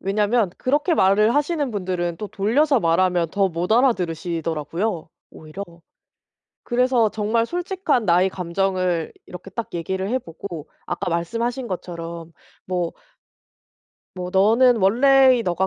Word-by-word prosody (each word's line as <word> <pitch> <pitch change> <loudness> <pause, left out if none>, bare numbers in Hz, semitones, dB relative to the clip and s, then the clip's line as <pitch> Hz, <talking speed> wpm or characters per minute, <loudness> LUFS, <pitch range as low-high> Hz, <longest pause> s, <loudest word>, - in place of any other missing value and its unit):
왜냐면 210 +1 +1
그렇게 290 +6 +1
말을 210 0 +3
하시는 295 -1 0
분들은 180 -4 -2
또 210 - -4
돌려서 255 +8 +2
말하면 170 -1 +2
더 195 +1 +1
못 175 +2 -4
알아들으시더라고요, 170 - -1 0.2
오히려. 155 +5 -9 1.0
그래서 245 -2 +2
정말 220 +2 0
솔직한 350 - -1
나의 180 0 +3
감정을 185 -2 -1
이렇게 180 +2 -10
딱 225 +4 -5
얘기를 190 +3 -3
해보고 175 - -5 0.2
아까 175 - -3
말씀하신 235 +9 -2
것처럼 170 -2 -6 0.3
뭐 180 -2 -2 1.2
뭐 180 0 -5
너는 230 +6 +4
원래의 255 +5 +5
네가 185 -1 0
195 Hz, 290 characters per minute, -22 LUFS, 175-240 Hz, 1.2 s, 원래의